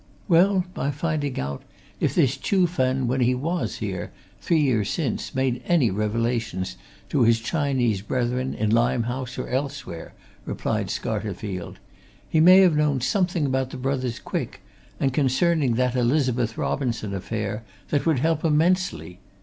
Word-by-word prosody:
"Well, 185 +1 +4
by 140 - -2
finding 145 -1 -2
out 70 +1 -4 0.4
if - - 0
this 135 0 +3
Chuh 180 +7 +2
Fen, 130 -5 0
when 130 +2 0
he 125 +1 +3
was 165 +7 -2
here, 95 -4 -4 0.3
three 165 - +1
years 120 -8 +1
since, 140 -7 -2
made 130 -2 0
any 150 - +3
revelations 105 -2 -1 0.3
to 145 - +1
his 115 -1 +4
Chinese 125 - 0
brethren 125 +4 -1
in 105 0 0
Limehouse 120 +2 0
or - - -4
elsewhere," 135 - -4 0.3
replied - - -2
Scarterfield. 100 -4 -4 0.5
"He 160 - +1
may 185 +4 +8
have 180 -5 +5
known 150 -3 +2
something 175 - +1
about 130 -1 0
the - - -7
brothers 130 -2 -2
Quick - - -5 0.4
and 135 -2 +1
concerning 140 -1 +2
that 125 +1 +1
Elizabeth 125 -2 +1
Robinson 120 -7 -2
affair 105 +2 -3 0.3
that 145 +2 0
would 160 -4 +3
help 160 +3 +1
immensely. 155 - +1
130 Hz, 145 wpm, -24 LUFS, 115-150 Hz, 0.5 s, may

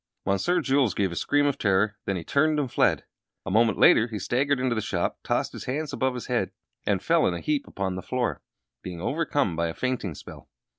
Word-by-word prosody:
Monsieur 135 - +1
Jules 135 -5 +2
gave 95 -3 0
a - - -5
scream 145 - +2
of 140 -1 0
terror. 100 +1 +2
Then 100 - -1
he 85 - -4
turned 150 - +2
and 135 -4 -2
fled. - - +2 0.4
A 95 - -3
moment 110 +2 +3
later 115 - +6
he 110 -3 -5
staggered 135 +5 0
into 130 -1 +1
the 110 - -1
shop, 90 -4 -2
tossed - - 0
his - - -7
hands 145 +3 -3
above 130 -2 0
his 125 - -5
head, - - 0 0.4
and - - +1
fell - - +3
in 90 - 0
a - - -4
heap 145 - -1
upon 95 -1 -3
the 95 - -5
floor 125 +4 -2 0.4
being 90 -2 -7
overcome 145 - 0
by 85 +1 0
a 80 - -5
fainting 125 -10 -2
spell. - - -12
120 Hz, 225 wpm, -26 LUFS, 95-140 Hz, 0.4 s, later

